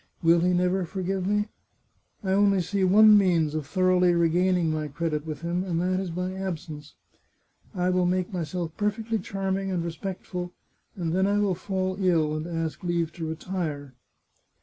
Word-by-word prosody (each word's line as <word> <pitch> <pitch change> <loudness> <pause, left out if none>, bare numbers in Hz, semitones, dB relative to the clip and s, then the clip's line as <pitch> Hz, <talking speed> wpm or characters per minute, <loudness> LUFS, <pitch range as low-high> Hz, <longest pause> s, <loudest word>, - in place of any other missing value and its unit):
Will 165 +1 +5
he 180 +2 +2
never 180 +1 +1
forgive 190 +1 -3
me? 210 +1 +1 0.7
I 190 - -1
only 200 0 +4
see 195 +2 -1
one 210 +3 +7
means 170 -6 +2
of 155 -3 -3
thoroughly 180 0 +3
regaining 170 0 +2
my 155 -1 -2
credit 150 +1 -3
with 155 0 -5
him, 170 +2 -1
and 175 -3 -2
that 185 +1 0
is 190 -2 -3
by 180 +2 -3
absence. 160 -6 -6 0.8
I 180 0 +1
will 180 -1 +2
make 185 +1 -1
myself 170 -1 -3
perfectly 220 +2 -1
charming 195 -1 -2
and 175 -3 -1
respectful, 180 +1 -5 0.4
and 170 -4 -2
then 190 +2 +2
I 205 +1 +2
will 205 -2 +2
fall 185 0 -2
ill, 160 -4 +2
and 155 +2 -4
ask 165 0 -4
leave 170 -2 -1
to 165 -2 -5
retire. 160 -5 -4
180 Hz, 170 wpm, -26 LUFS, 165-190 Hz, 0.8 s, one